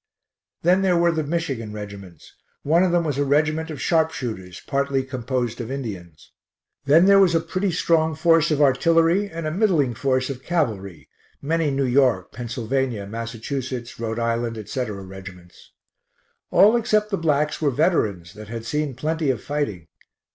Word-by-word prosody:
Then 180 +3 +4
there 185 -2 +2
[were 170 0 +3
the] 160 -1 -1
Michigan 140 -8 -3
regiments; 100 -5 -10 0.3
one 165 +4 +3
of 185 -1 +2
them 175 -1 +2
was 145 -4 -2
a - - +3
regiment 155 +3 +1
of 150 -4 -6
sharpshooters, 125 - -1
partly 140 -1 0
composed 125 -2 -3
of 115 - -6
Indians. 100 - -7 0.5
Then 155 +5 +6
there 200 0 +6
was 180 -4 +4
a - - +4
pretty 185 +4 -2
strong 160 -2 +1
force 165 +1 +3
of 150 -1 +2
artillery 165 +7 +3
and 165 -2 -6
a 155 - -1
middling 165 - +2
force 130 +3 0
of 130 -1 -8
cavalry 105 - -2 0.3
many 160 +1 0
New 135 0 0
York, 125 -7 +2
Pennsylvania, 120 -1 -3
Massachusetts, 115 +3 -5
R. 115 0 -3
I., 115 0 0
etc., 110 -2 -4
reg'ts. 95 -2 -12 0.8
All 210 +4 +6
except 215 -2 +1
the 195 - 0
blacks 150 -2 0
were 150 - +3
veterans 110 - 0
[that 105 0 -11
had] 115 +1 -6
seen 145 +2 -2
plenty 155 +2 -1
of 125 -5 -1
fighting. 140 - -3
135 Hz, 160 wpm, -23 LUFS, 115-165 Hz, 0.8 s, Then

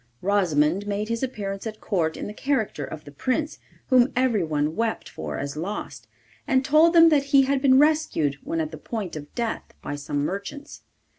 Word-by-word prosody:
Rosimond 185 -2 +2
made 205 +1 -2
his 230 0 -2
appearance 205 -5 -4
at 215 -1 -7
Court 165 -6 -1
in - - -5
the 210 - -6
character 225 - -1
of 155 +2 -7
the 145 - -10
Prince, 260 - -2 0.3
whom 255 0 +5
everyone 165 - +1
wept 230 0 -2
for 75 -1 -6
as 140 +1 -4
lost, 185 +7 -5 0.4
and 265 -2 +2
told 310 +4 +5
them 330 -1 +8
that 290 -3 +3
he 275 -1 +5
had 270 0 0
been 265 -2 +5
rescued 290 - +2
when 165 - -2
at 155 -1 -2
the 155 - -9
point 205 -2 -5
of 145 -1 -8
death 235 -2 -3
by - - -4
some 145 0 -2
merchants. 200 - -6
210 Hz, 190 wpm, -24 LUFS, 160-265 Hz, 0.4 s, them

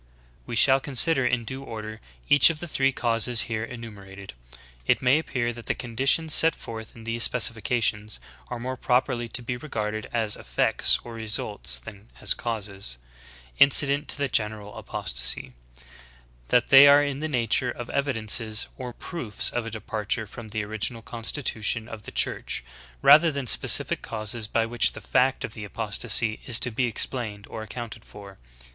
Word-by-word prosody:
15. - - -32
We 120 - -4
shall 135 +3 +5
consider 135 0 +2
in 125 -2 -1
due 130 +4 -6
order 110 -3 -8 0.3
each 145 - +7
of 160 -2 -3
the 175 - -6
three 135 -3 +1
causes 115 -1 +1
here 110 -1 -3
enumerated. 100 -5 -10 0.5
It - - +3
may 130 +4 +3
appear 120 -6 -2
that 120 0 -12
the - - 0
conditions 135 +6 0
set 165 -1 +5
forth 110 -1 -9
in 115 - -12
these 115 +1 -2
specifications 110 - +1 0.3
are 125 - -5
more 130 +2 -5
properly 125 -1 0
to 120 +2 -3
be 125 +1 -4
re 155 +5 -11
garded 110 -1 -3
as 110 -3 0
effects - - +1
or 120 - -9
results, 105 - -1
than 100 - -12
as - - 0
causes, 100 - -4 0.6
incident 140 +1 +4
to - - -2
the 140 -1 -1
general 105 -3 -2
apostasy, 65 +1 -2 0.5
— - - -25
that 125 - +2
they 135 +1 +9
are 145 +1 +7
in 140 -1 -3
the 155 - -3
nature 125 -2 0
of 120 0 -6
evidences 115 -5 0
or 125 -2 -6
proofs 125 - -2
of 120 -2 -3
a - - -3
departure 110 0 -4
from 110 +2 -10
the 105 0 -3
original 110 +2 -2
constitution 115 -2 -2
of 110 -2 -9
the - - -8
Church, - - -1 0.4
rather 155 +4 +7
than 140 -2 -4
specific - - +4
causes 110 0 -4
by 115 +1 0
which 115 0 +1
the - - -8
fact 130 +1 +1
of 110 - -9
apostasy 110 +1 -2
is 115 -3 +6
to 120 - 0
be 125 +3 0
explained 110 -3 -2
or 110 - -6
accounted 115 +1 -8
for. 100 -1 -13
115 Hz, 170 wpm, -25 LUFS, 110-125 Hz, 0.6 s, they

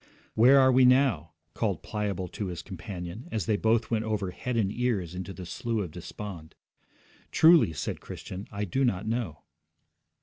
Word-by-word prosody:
'Where 130 +5 +6
are 130 0 +6
we 130 +1 +5
now?' 125 - +4 0.2
called - - -1
Pliable 100 -3 -3
to 100 - -4
his 90 -2 -6
companion, 90 - -7
as 110 -6 -1
they 110 - +2
both 110 +2 +1
went 110 -1 +1
over 105 -4 -2
head 125 +6 -3
and 100 -4 +1
ears 105 -8 -1
into 90 +1 -5
the 95 -1 -8
Slough 115 +2 -2
of 85 - -7
Despond. 90 -1 -8 0.8
'Truly,' 160 - +6
said - - -4
Christian, 95 +2 -8
'I 105 0 -3
do 135 +9 0
not 105 -5 0
know.' 110 - -3
105 Hz, 170 wpm, -28 LUFS, 90-120 Hz, 0.8 s, Where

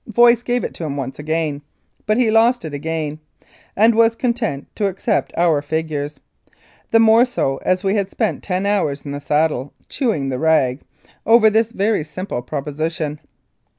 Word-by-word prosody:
Voice 235 +1 +5
gave 245 0 -1
it - - -4
to - - -7
him 145 -3 -3
once, 135 0 -5 0.9
but 215 +1 +2
he 240 -3 +3
lost 230 0 +3
it 155 - -6
again, 155 0 -3 0.6
and 225 +3 +5
was 230 0 +3
content 230 - -2
to 205 - 0
accept 190 0 -1
our 165 -4 +3
figures, 150 -1 -3 0.7
the 225 - +4
more 225 +1 +6
so 190 - -1
as 185 +5 -1
we 195 0 +1
had 200 -2 0
spent 220 0 -2
ten 185 0 -2
hours 190 -9 0
in 145 - -6
the 145 0 -5
saddle 150 -3 0 0.2
"chewing 210 - -1
the 130 -1 -3
rag" 150 -5 +2 0.4
over 225 -1 +5
this 225 +1 +2
very 205 -5 0
simple 155 -3 -5
proposition. 150 +3 -4
180 Hz, 165 wpm, -19 LUFS, 150-225 Hz, 0.9 s, more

